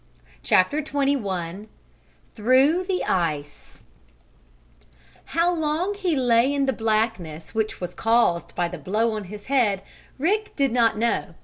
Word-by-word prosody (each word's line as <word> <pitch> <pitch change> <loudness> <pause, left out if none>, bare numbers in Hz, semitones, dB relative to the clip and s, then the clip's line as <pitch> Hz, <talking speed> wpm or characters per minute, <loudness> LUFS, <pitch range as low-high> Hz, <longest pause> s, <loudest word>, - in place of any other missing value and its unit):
CHAPTER 235 - +2
XXI 215 - -2 0.7
THROUGH 260 - +3
THE 370 -1 -1
ICE 150 -5 -3 1.4
How 340 +2 +1
long 325 +4 -1
he 380 -5 -1
lay 245 0 +3
in 280 -1 +1
the 265 - +1
blackness, 215 -8 -2
which 220 -1 -2
was 180 -1 -5
caused 225 -7 +1
by 175 - 0
the 175 -1 -8
blow 215 +8 0
on 215 -2 -4
his 205 +2 -10
head, 225 -8 +1 0.3
Rick 420 +9 0
did 275 -3 +1
not 230 -2 +2
know. 220 -6 -1
230 Hz, 130 wpm, -24 LUFS, 190-285 Hz, 1.4 s, THROUGH